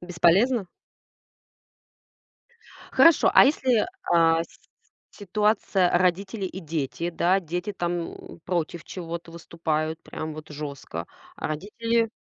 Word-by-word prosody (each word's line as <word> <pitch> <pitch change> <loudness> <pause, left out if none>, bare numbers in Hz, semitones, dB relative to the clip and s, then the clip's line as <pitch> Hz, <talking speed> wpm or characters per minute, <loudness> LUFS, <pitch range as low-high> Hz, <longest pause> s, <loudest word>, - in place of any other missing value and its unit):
Бесполезно? 180 +6 +3 2.3
Хорошо. 330 -2 +6
А - - +9
если, 260 -5 +2 0.3
а, 165 -1 +4
с - - -21 0.5
ситуация 205 -2 +1
родители 190 +3 0
и 190 0 -5
дети, 160 0 -3
да? 180 +3 +2
Дети 180 +4 -4
там 175 -2 -3 0.3
против 170 -2 -2
чего-то 170 -2 -7
выступают, 160 -1 -3
прям 155 0 -6
вот 155 0 -10
жёстко. 145 -2 -6 0.3
А - - -4
родители 225 +8 -1
175 Hz, 105 wpm, -25 LUFS, 165-200 Hz, 2.3 s, А